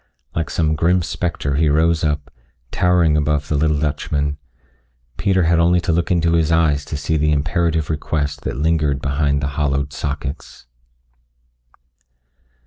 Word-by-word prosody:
Like 80 -2 -2
some 80 -2 0
grim 85 +3 +2
spectre 75 -6 -2
he 80 0 +3
rose 80 +2 +2
up, 75 -2 -2 0.4
towering 90 -3 +3
above 75 -1 0
the 75 - 0
little 75 +1 +2
Dutchman. 75 0 -2 0.8
Peter 95 +6 +1
had 85 0 +3
only 85 +1 +4
to 85 - -1
look 85 +1 0
into 85 -2 +2
his 80 -1 +2
eyes 80 -3 +2
to 75 - -5
see 80 +2 -1
the 75 0 +1
imperative 80 +2 0
request 75 -2 -2
that - - -4
lingered 75 -2 +1
behind 70 +1 0
the 70 - -1
hollowed 70 0 -1
sockets. 70 -2 -5
75 Hz, 145 wpm, -19 LUFS, 75-85 Hz, 0.8 s, only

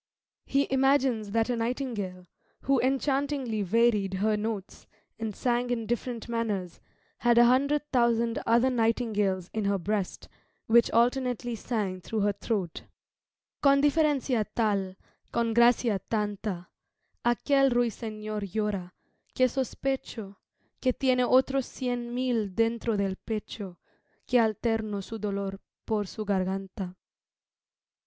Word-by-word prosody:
He 275 +1 +2
imagines 265 -5 +2
that 225 +2 +1
a - - +1
nightingale, 230 -6 -3 0.4
who 270 -1 +3
enchantingly 270 -3 0
varied 205 -1 +2
her 210 +3 +1
notes, 210 -2 -5 0.3
and 220 -3 -3
sang 245 0 0
in 235 -2 -1
different 240 +1 -3
manners, 210 -7 -2 0.4
had 240 -1 +3
a 240 - +8
hundred 280 +4 +3
thousand 235 -1 +2
other 235 +3 +4
nightingales 220 -6 0
in 220 -2 -1
her 200 0 +2
breast, 195 +1 -3 0.4
which 235 +1 +5
alternately 245 0 +1
sang 205 -5 -3
through 215 +4 -2
her 205 0 +2
throat 195 -5 -3 0.8
"Con 280 -1 +5
diferancia 290 -5 +2
tal, 200 -4 0 0.4
con 230 -1 0
gracia 235 -3 +4
tanta, 205 -4 -2 0.5
A 240 0 +3
quel 275 +1 +3
ruysenor 215 -3 -2
llora, 200 -2 -2 0.4
que 255 - +4
sospecho 255 -5 -3 0.4
Que 255 -1 +2
tiene 255 -1 +2
otros 265 +1 +3
cien 245 -2 -3
mil 235 -6 -1
dentro 230 -1 +1
del 195 -1 -1
pecho, 205 -4 -6 0.5
Que 250 - +3
alterno 220 -2 0
su 225 +3 -7
dolor 200 -1 -3 0.3
por 215 -2 0
su 215 +3 -6
garganta." 190 -1 -2
225 Hz, 120 wpm, -28 LUFS, 205-250 Hz, 0.8 s, a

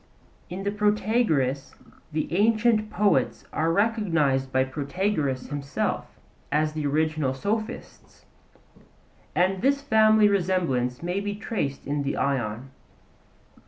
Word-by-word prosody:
In 185 +2 -5
the 200 - 0
Protagoras 205 - +1 0.4
the 155 +2 -2
ancient 215 +1 +3
poets 205 -2 +1
are 165 +1 +1
recognized 165 - +1
by 130 0 +3
Protagoras 140 0 -2
himself 140 -1 -2 0.4
as 155 +1 +1
the 155 -2 -2
original 155 -2 0
sophists; 215 - -5 1.1
and 185 +1 +2
this 280 +3 +2
family 220 -3 +5
resemblance 170 -10 0
may 180 +3 -1
be 205 0 -3
traced 150 -10 -3
in 145 0 -1
the 140 0 -2
Ion. 130 -2 -2
170 Hz, 110 wpm, -25 LUFS, 140-210 Hz, 1.1 s, family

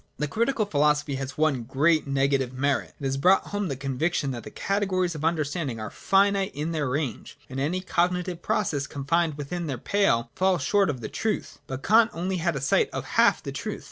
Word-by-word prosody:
(i) - - -37 0.2
The 150 - +1
Critical 230 - 0
philosophy 150 -4 +1
has 135 +1 -5
one 150 -5 +2
great 145 +6 +2
negative 135 -2 +1
merit. 140 +2 -1
It - - -11
has 135 0 0
brought 185 +7 +3
home 205 -1 -2
the 140 - -3
conviction 140 +3 -1
that 120 -2 -5
the - - -8
categories 190 -3 0
of 155 -1 -7
understanding 155 -5 -1
are 110 - -5
finite 195 0 +2
in 150 +3 -2
their 150 -5 -1
range, 140 0 -3
and 130 -1 -5
that - - 0
any 180 +5 -1
cogni 180 -1 +1
tive 175 -2 -6
process 175 -10 -1
confined 155 +2 0
within 165 +4 -4
their 135 -4 -3
pale 120 - +1
falls 185 -1 +1
short 200 -3 +3
of 130 -4 -3
the - - -4
truth. 220 -2 -3
But 130 0 -6
Kant 225 +1 +5
had - - -7
only 185 +1 -1
a 165 -5 -1
sight 135 - +2
of - - -4
half - - +4
the - - -5
truth. - - -4
155 Hz, 215 wpm, -26 LUFS, 135-185 Hz, 0.2 s, Kant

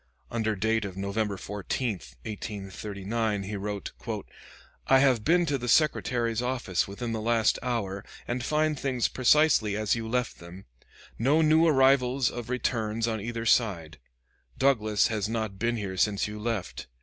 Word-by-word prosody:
Under 110 -2 0
date 110 +3 +1
of 95 -2 -6
November 100 +1 -2
14, 105 +6 -3 0.3
1839, 105 +1 -3
he 105 +2 -5
wrote: 100 0 -4 1.0
"I 135 - +6
have 130 -5 +3
been 175 +5 +3
to 140 -3 -1
the 120 - -5
Secretary's 120 -5 +2
office 125 -8 -1
within 115 +4 -5
the 110 -1 -2
last 115 0 +2
hour, 110 -6 -2 0.2
and 120 +1 -2
find 155 +1 +1
things 130 -4 0
precisely 130 -6 +3
as 110 -1 +1
you 115 -1 -3
left 125 +1 -1
them; 85 +3 -11 0.5
no 145 +7 +3
new 160 +2 +5
arrivals 135 -3 +3
of 120 -1 -7
returns 115 -3 -1
on 110 -2 -2
either 115 +1 -4
side. 85 -10 +1 0.6
Douglas 110 -6 +3
has 110 -2 -1
not 110 -4 -3
been 120 0 0
here 95 -3 -4
since 100 +2 +1
you 105 0 -7
left. 110 -4 -4
115 Hz, 150 wpm, -28 LUFS, 105-125 Hz, 1.0 s, I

